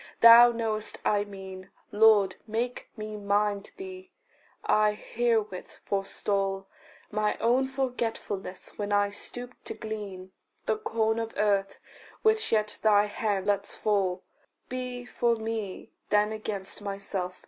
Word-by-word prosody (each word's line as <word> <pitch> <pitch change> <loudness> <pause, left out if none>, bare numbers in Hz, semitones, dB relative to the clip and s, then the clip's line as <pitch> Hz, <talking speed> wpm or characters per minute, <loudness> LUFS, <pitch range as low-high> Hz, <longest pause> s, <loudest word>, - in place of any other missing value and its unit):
Thou 235 +1 +10
know'st 220 -2 -2
I 205 -1 +2
mean 190 -2 -9 0.2
Lord, 205 -3 +5
make 235 +3 -3
me 215 0 -5
mind 205 0 0
thee. 375 0 -8 0.6
I 215 0 +4
herewith 220 -3 -1
forestall 195 0 -1 0.5
My 215 0 0
own 250 +3 +2
forgetfulness, 235 -9 -3
when 205 0 -2
I 205 0 +3
stoop 245 +4 -7
to - - -4
glean 200 -4 -6 0.3
The - - +1
corn 225 - 0
of 225 0 -4
earth 200 -1 +1 0.5
which 440 0 +3
yet 215 -1 +1
thy 210 -1 +5
hand 205 -2 -1
lets 200 -1 0
fall. 195 -3 0 0.5
Be 250 -1 -4
for 235 -1 +1
me 220 -3 -4 0.2
then 210 +1 +3
against 215 -2 -4
myself. 195 -2 -3
210 Hz, 125 wpm, -28 LUFS, 200-230 Hz, 0.6 s, Thou